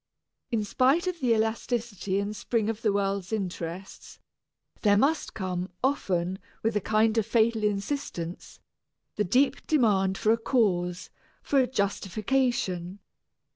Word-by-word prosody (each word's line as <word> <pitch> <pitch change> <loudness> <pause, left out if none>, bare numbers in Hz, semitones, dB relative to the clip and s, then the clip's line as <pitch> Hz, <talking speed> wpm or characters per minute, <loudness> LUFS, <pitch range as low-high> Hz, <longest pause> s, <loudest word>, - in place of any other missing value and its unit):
In 230 -4 0
spite 265 - +2
of 365 -2 -2
the 250 -4 +1
elasticity 220 -3 -1
and 205 +1 -3
spring 225 0 0
of 225 0 -9
the 215 - +2
world's 200 -1 -1
interests, 185 -3 -5 0.6
there 205 -2 +4
must 295 +8 +1
come 185 -2 -3
often, 195 -11 +1
and 190 +1 -5 0.2
with 225 0 +1
a 210 - +2
kind 220 +2 +2
of 215 - 0
fatal 225 -1 +2
insistence, 200 - -3 0.6
the 210 - +1
deep 260 +8 +1
demand 200 -10 +3
for 220 - +2
a 230 - +2
cause, 185 -8 0 0.3
for 280 - +2
a 255 - +3
justification. 200 -3 -1
215 Hz, 135 wpm, -27 LUFS, 190-240 Hz, 0.6 s, there